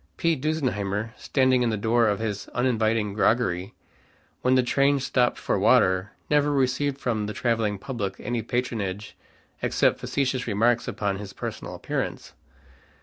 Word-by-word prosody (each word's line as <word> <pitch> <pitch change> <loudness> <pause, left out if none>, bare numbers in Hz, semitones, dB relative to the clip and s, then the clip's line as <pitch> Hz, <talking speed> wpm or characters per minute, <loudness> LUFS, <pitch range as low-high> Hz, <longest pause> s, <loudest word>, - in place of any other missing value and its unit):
P. 165 -2 +2
Dusenheimer, 115 -8 -2
standing 130 -2 +2
in 120 - +2
the 110 - -1
door 115 +2 +2
of 105 -1 +1
his 105 -2 -4
uninviting 115 -4 +1
groggery, 105 -3 +1 0.7
when 130 +1 +3
the 130 - +4
trains 140 +2 +2
stopped 125 -1 +2
for - - -1
water; 95 +1 +4 0.2
never 150 0 +3
received 135 0 +1
from 110 -5 -1
the 105 - -4
traveling 115 -4 0
public 100 -3 -4
any 120 -1 -3
patronage 110 -4 -3 0.5
except - - +2
facetious 130 -2 -1
remarks 115 +3 +2
upon 100 -2 -2
his 100 -1 -8
personal - - -6
appearance. - - -4
115 Hz, 145 wpm, -25 LUFS, 105-130 Hz, 0.7 s, the